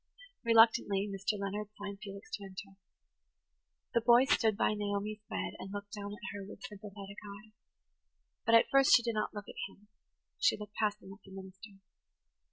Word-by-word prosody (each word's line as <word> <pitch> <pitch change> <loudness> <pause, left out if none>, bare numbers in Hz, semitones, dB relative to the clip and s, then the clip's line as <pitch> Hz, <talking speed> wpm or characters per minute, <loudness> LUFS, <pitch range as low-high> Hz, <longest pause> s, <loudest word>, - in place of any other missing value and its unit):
Reluctantly 225 -3 +5
Mr. 195 +1 -2
Leonard 200 +1 -3
signed 200 -1 -6
Felix 200 +7 -9
to 205 - -4
enter. 195 0 -9 1.2
The 235 - +3
boy 240 +2 +6
stood 220 -5 +3
by 215 - +2
Naomi's 205 0 -2
bed - - -3
and 195 - -7
looked 205 0 -6
down 205 -1 -5
at 190 -1 -7
her 205 -1 -6
with 205 +5 -11
sympathetic 200 -2 -9 0.3
eyes. 220 - -22 0.9
But 230 - +5
at 230 - +7
first 275 0 +7
she 240 - +4
did 230 -1 -1
not 215 0 -2
look 205 -1 -5
at - - -8 0.2
him–she 210 - -3
looked 210 -1 -9
past 210 -1 -1
him 190 - -10
at 195 - -15
the - - -16
minister. 190 +1 -11
205 Hz, 175 wpm, -33 LUFS, 195-220 Hz, 1.2 s, at